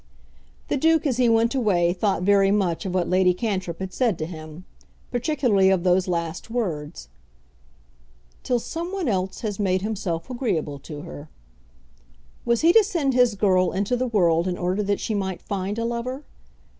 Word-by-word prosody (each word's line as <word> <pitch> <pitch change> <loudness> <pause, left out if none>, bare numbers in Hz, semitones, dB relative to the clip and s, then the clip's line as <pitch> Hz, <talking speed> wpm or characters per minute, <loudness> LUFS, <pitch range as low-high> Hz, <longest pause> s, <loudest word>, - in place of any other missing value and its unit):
The - - 0
Duke 320 +2 +3
as 260 -5 +1
he 250 -2 +3
went 230 +2 +3
away 185 -9 +2
thought 190 0 0
very 195 0 +4
much 195 -3 0
of 185 - -3
what 180 -2 +1
Lady 180 -1 +3
Cantrip 185 -5 -3
had 190 -1 -6
said 235 -9 +1
to 155 - -3
him; 160 +1 -9 0.5
particularly 245 -7 +2
of 190 -3 +2
those 185 0 +2
last 170 +1 -3
words. 165 - -4 1.3
"Till 250 - 0
some 335 +9 -5
one 385 -5 -2
else 190 -3 -1
has 210 -3 -4
made 190 -2 +1
himself 185 -6 -3
agreeable 195 - -2
to 145 +1 -8
her." 145 0 -10 1.2
Was 235 -1 +2
he 335 +2 +5
to 445 - +7
send 335 -10 0
his 245 -3 +3
girl 185 -3 +2
into 200 +6 0
the 255 +1 -1
world 175 -6 +2
in 180 -1 -2
order 185 +3 -1
that 205 0 0
she 220 - -2
might 190 -3 -2
find 200 +1 -3
a 230 - -1
lover? 245 +4 -3
195 Hz, 175 wpm, -24 LUFS, 180-240 Hz, 1.3 s, to